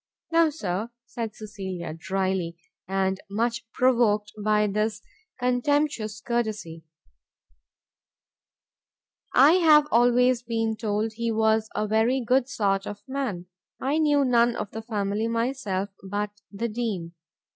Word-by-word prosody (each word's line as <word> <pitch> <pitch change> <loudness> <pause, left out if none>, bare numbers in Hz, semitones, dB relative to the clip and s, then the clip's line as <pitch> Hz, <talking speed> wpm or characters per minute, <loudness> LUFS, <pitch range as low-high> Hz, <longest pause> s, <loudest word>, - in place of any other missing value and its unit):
"No, 330 -1 +5
Sir," 210 - -3 0.2
said 230 -2 -5
Cecilia, 190 -6 -6
drily, 185 0 -2 0.3
and 190 0 0
much 230 +2 -2
provoked 230 -5 +2
by 210 0 +3
this 210 +1 -1 0.4
contemptuous 250 -3 0
courtesy. 215 -9 -3 2.5
"I 275 +4 +8
have 305 -4 +6
always 245 +1 +4
been 225 -2 -1
told 215 0 -1
he 230 +1 -2
was 220 0 +2
a 210 - 0
very 225 +5 +2
good 255 +2 +1
sort 195 -5 0
of 205 0 -7
man: 260 -10 -3 0.3
I 285 +4 0
knew 290 -3 +3
none 240 -1 +3
of 210 - -4
the 225 - -5
family 210 -1 -1
myself, 230 -4 -1 0.2
but 205 +1 -2 0.2
the 210 +3 -2
Dean. 210 -7 -3
220 Hz, 120 wpm, -26 LUFS, 205-245 Hz, 2.5 s, I